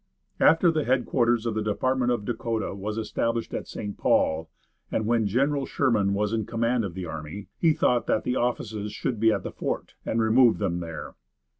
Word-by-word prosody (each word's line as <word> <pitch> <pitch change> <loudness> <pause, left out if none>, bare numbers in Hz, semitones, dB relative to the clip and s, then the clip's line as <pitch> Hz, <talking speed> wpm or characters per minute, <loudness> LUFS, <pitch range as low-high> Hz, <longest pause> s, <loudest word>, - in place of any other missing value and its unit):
After 165 +2 +5
the 155 -2 0
headquarters 120 -2 +1
of 115 - 0
the 110 - -1
Department 125 +4 0
of 115 -4 -1
Dakota 115 -2 -2
was 105 +2 -4
established 115 +1 -2
at - - -4
St. 100 -1 -6
Paul, 80 +1 +2 0.4
and 110 - 0
when 115 -1 +2
General 135 +6 +1
Sherman 105 -7 +1
was 105 +2 0
in 110 -1 -1
command 115 +1 0
of 95 -4 -5
the 95 -1 -4
army, 80 +4 -7
he 165 -2 +4
thought 120 -5 +1
that - - +1
the 125 - -1
offices 110 -3 -2
should 115 +1 -3
be 110 +1 +5
at - - -1
the - - -5
fort, - - -4
and 115 - -1
removed 115 +2 +5
them 90 -4 -1
there. 80 -2 -7
115 Hz, 190 wpm, -26 LUFS, 105-125 Hz, 0.4 s, After